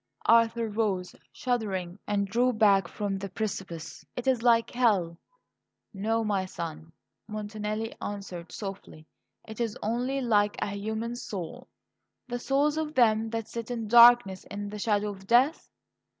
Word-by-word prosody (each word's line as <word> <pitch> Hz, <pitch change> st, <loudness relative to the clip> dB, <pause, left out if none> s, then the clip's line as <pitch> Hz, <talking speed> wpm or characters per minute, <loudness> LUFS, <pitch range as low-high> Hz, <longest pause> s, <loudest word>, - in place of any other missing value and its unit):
Arthur 230 Hz, 0 st, +4 dB
rose, 205 Hz, -4 st, -1 dB, 0.2 s
shuddering, 200 Hz, -7 st, -2 dB
and 205 Hz, -1 st, +1 dB
drew 240 Hz, +6 st, +2 dB
back 200 Hz, -5 st, +4 dB
from 195 Hz, +1 st, -3 dB
the 195 Hz, 0 st, -5 dB
precipice. 190 Hz, -6 st, -5 dB
"It 245 Hz, -, -5 dB
is 260 Hz, -3 st, +2 dB
like 230 Hz, -1 st, +3 dB
hell." 195 Hz, -9 st, +1 dB, 0.7 s
"No, 225 Hz, +3 st, 0 dB
my 205 Hz, -3 st, 0 dB
son," 160 Hz, -3 st, -7 dB, 0.4 s
Montanelli 215 Hz, +1 st, -4 dB
answered 195 Hz, -4 st, -6 dB
softly, 195 Hz, -6 st, -8 dB, 0.4 s
"it 220 Hz, 0 st, -9 dB
is 225 Hz, -3 st, -2 dB
only 245 Hz, +5 st, -1 dB
like 210 Hz, -5 st, +2 dB
a 200 Hz, -, -2 dB
human 220 Hz, +3 st, -3 dB
soul." 220 Hz, +2 st, -6 dB, 0.6 s
"The 245 Hz, 0 st, -3 dB
souls 285 Hz, +4 st, +1 dB
of 310 Hz, -1 st, -3 dB
them 225 Hz, -3 st, +3 dB
that 225 Hz, -1 st, -3 dB
sit 230 Hz, 0 st, -6 dB
in 230 Hz, -3 st, -3 dB
darkness 235 Hz, -4 st, +7 dB
and 205 Hz, 0 st, -5 dB
in 205 Hz, -, -5 dB
the 210 Hz, -, -6 dB
shadow 210 Hz, -1 st, +1 dB
of 195 Hz, -1 st, -12 dB
death?" 250 Hz, +7 st, +3 dB
215 Hz, 150 wpm, -28 LUFS, 195-235 Hz, 0.7 s, darkness